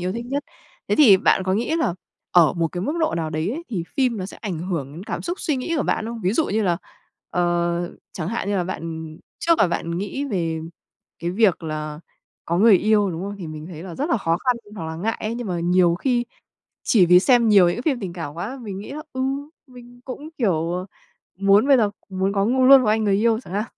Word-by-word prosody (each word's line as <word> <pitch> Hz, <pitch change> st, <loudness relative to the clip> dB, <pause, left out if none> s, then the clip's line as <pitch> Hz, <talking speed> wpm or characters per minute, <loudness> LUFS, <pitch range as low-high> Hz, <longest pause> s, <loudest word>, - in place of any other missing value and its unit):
yêu 180 Hz, +1 st, -2 dB
thích 235 Hz, +2 st, -5 dB
nhất. 275 Hz, +2 st, -2 dB, 0.4 s
Thế -, -, +1 dB
thì 245 Hz, -11 st, +8 dB
bạn 190 Hz, -, +2 dB
có 185 Hz, 0 st, +1 dB
nghĩ 240 Hz, +10 st, 0 dB
là 320 Hz, -, 0 dB, 0.4 s
ở 165 Hz, -5 st, +5 dB
một 165 Hz, -1 st, 0 dB
cái 175 Hz, -, -3 dB
mức 290 Hz, -, -1 dB
độ 320 Hz, -, +1 dB
nào 160 Hz, -2 st, -2 dB
đấy 155 Hz, +5 st, -1 dB
ấy 325 Hz, +8 st, -5 dB
thì 180 Hz, -8 st, -3 dB
phim 255 Hz, -4 st, +2 dB
nó 185 Hz, -2 st, -4 dB
sẽ -, -, -11 dB
ảnh 190 Hz, -7 st, -5 dB
hưởng 165 Hz, -6 st, -4 dB
đến 175 Hz, +6 st, -9 dB
cảm -, -, -4 dB
xúc 350 Hz, +2 st, -4 dB
suy 300 Hz, -4 st, 0 dB
nghĩ 295 Hz, +7 st, -2 dB
của 290 Hz, -, +1 dB
bạn 220 Hz, -, -1 dB
không? 230 Hz, -1 st, -6 dB
Ví 185 Hz, +3 st, +1 dB
dụ 310 Hz, +6 st, +1 dB
như 215 Hz, +1 st, 0 dB
là, 175 Hz, -3 st, +1 dB, 0.5 s
ờ, 175 Hz, 0 st, 0 dB, 0.2 s
chẳng 170 Hz, -1 st, -4 dB
hạn 225 Hz, -3 st, -3 dB
như 205 Hz, -, 0 dB
là 180 Hz, -, 0 dB
bạn, 160 Hz, -3 st, -6 dB, 0.2 s
trước 335 Hz, -1 st, +2 dB
là -, -, +5 dB
bạn 170 Hz, 0 st, -2 dB
nghĩ 205 Hz, +8 st, -3 dB
về 165 Hz, -8 st, -2 dB, 0.6 s
cái 170 Hz, -, -3 dB
việc 190 Hz, -3 st, +2 dB
là 155 Hz, -1 st, -5 dB, 0.4 s
có 170 Hz, +1 st, -1 dB
người 210 Hz, -1 st, +7 dB
yêu, 210 Hz, -1 st, +2 dB
đúng 165 Hz, 0 st, -5 dB
không? 200 Hz, +1 st, -5 dB
Thì 180 Hz, -, -6 dB
mình 155 Hz, 0 st, -8 dB
thấy 165 Hz, -2 st, -9 dB
là 180 Hz, -3 st, -8 dB
rất 295 Hz, -, -2 dB
là -, -, +3 dB
khó 165 Hz, -6 st, 0 dB
khăn 250 Hz, +5 st, 0 dB, 0.2 s
hoặc 165 Hz, -, -5 dB
là 160 Hz, 0 st, -5 dB
ngại 220 Hz, +7 st, -2 dB
ấy, 220 Hz, +2 st, -3 dB
nhưng 245 Hz, -1 st, -5 dB
mà 175 Hz, -3 st, -2 dB
nhiều 175 Hz, 0 st, +3 dB
khi 240 Hz, +5 st, 0 dB, 0.6 s
chỉ 190 Hz, -7 st, +4 dB
vì 180 Hz, +1 st, +7 dB
xem 240 Hz, -1 st, +4 dB
nhiều 200 Hz, -4 st, +6 dB
những 175 Hz, -, -1 dB
cái 240 Hz, -, -5 dB
phim 270 Hz, -5 st, 0 dB
tình 185 Hz, -4 st, -5 dB
cảm 165 Hz, -4 st, -6 dB
quá, 205 Hz, +11 st, -5 dB
mình 200 Hz, -3 st, -6 dB
nghĩ 205 Hz, -, -8 dB
là, 305 Hz, +2 st, -6 dB
ừ, 260 Hz, -, -4 dB, 0.5 s
mình 245 Hz, -1 st, -15 dB
cũng, 280 Hz, +3 st, -7 dB
kiểu, 175 Hz, -, 0 dB
à, 185 Hz, -, -6 dB, 0.5 s
muốn 200 Hz, +6 st, +4 dB
bây 275 Hz, -, +7 dB
giờ 215 Hz, -4 st, +2 dB, 0.2 s
muốn 190 Hz, 0 st, -1 dB
có 200 Hz, 0 st, +1 dB
ngu 255 Hz, +3 st, +2 dB
luôn 270 Hz, -1 st, +9 dB
một 215 Hz, -, 0 dB
anh 215 Hz, 0 st, +2 dB
người 200 Hz, -1 st, +3 dB
yêu 225 Hz, +2 st, +2 dB
chẳng 180 Hz, -, -12 dB
hạn. 210 Hz, -, 0 dB
195 Hz, 255 wpm, -22 LUFS, 170-235 Hz, 0.6 s, luôn